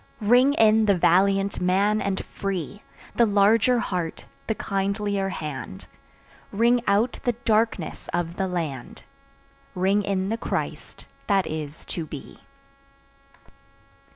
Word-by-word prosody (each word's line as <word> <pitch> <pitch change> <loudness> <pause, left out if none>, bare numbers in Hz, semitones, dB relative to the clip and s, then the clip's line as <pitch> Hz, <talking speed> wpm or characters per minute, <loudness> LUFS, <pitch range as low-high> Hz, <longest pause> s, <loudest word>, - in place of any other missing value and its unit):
Ring 250 +6 +4
in 220 0 +4
the 200 -2 +4
valiant 195 +3 +2
man 200 +4 +2
and 195 -1 -2
free, 195 0 -5 0.4
The 235 - +5
larger 215 +4 +4
heart, 180 -8 -3 0.2
the 220 - 0
kindlier 200 0 -1
hand; 150 - -6 0.7
Ring 235 +4 +3
out 210 +5 +1
the 245 - +1
darkenss 220 -6 0
of 170 0 -2
the 190 - 0
land, 160 -9 -5 0.7
Ring 190 +3 +2
in 195 -1 -1
the 225 - -1
Christ - - -5 0.2
that 195 -2 +2
is 155 -1 -6
to 165 -3 -5
be. 145 -3 -10
200 Hz, 120 wpm, -24 LUFS, 180-215 Hz, 0.7 s, The